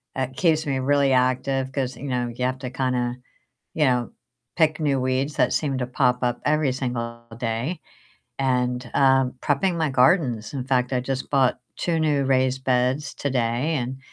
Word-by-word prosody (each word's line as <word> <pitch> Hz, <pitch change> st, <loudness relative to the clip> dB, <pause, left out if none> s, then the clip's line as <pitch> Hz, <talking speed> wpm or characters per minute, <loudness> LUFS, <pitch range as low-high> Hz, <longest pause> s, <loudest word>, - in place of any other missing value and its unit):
it 130 Hz, 0 st, -3 dB
keeps 160 Hz, -3 st, +2 dB
me 135 Hz, -2 st, -1 dB
really 140 Hz, 0 st, +2 dB
active, 130 Hz, +1 st, +1 dB
'cause, 130 Hz, -2 st, -2 dB
you 145 Hz, -, -8 dB
know, 125 Hz, -1 st, -1 dB
you 120 Hz, +2 st, -3 dB
have 130 Hz, 0 st, -1 dB
to 130 Hz, -1 st, -5 dB
kinda, 125 Hz, -1 st, -1 dB, 0.6 s
you 155 Hz, -, +2 dB
know, 125 Hz, -3 st, +1 dB, 0.4 s
pick 155 Hz, -2 st, +2 dB
new 145 Hz, -3 st, +1 dB
weeds 130 Hz, +3 st, -1 dB
that -, -, +2 dB
seem 140 Hz, -4 st, 0 dB
to 125 Hz, -, -2 dB
pop 125 Hz, -1 st, +1 dB
up 120 Hz, 0 st, 0 dB
every 150 Hz, -2 st, +2 dB
single 120 Hz, -2 st, -4 dB, 0.2 s
day, 120 Hz, +8 st, -2 dB, 0.6 s
and, 125 Hz, -2 st, 0 dB
um, 135 Hz, -2 st, +4 dB
prepping 170 Hz, +5 st, +1 dB
my 160 Hz, -3 st, 0 dB
gardens, 125 Hz, -, +2 dB
In 130 Hz, -3 st, -3 dB
fact, 125 Hz, -1 st, 0 dB
I 125 Hz, -, +1 dB
just 130 Hz, +1 st, -4 dB
bought 135 Hz, -3 st, +2 dB, 0.2 s
2 170 Hz, -2 st, 0 dB
new 145 Hz, -3 st, +2 dB
raised 130 Hz, 0 st, +1 dB
beds 130 Hz, +3 st, +1 dB
today, 125 Hz, +2 st, -1 dB
and 130 Hz, 0 st, -3 dB
130 Hz, 175 wpm, -24 LUFS, 125-140 Hz, 0.6 s, um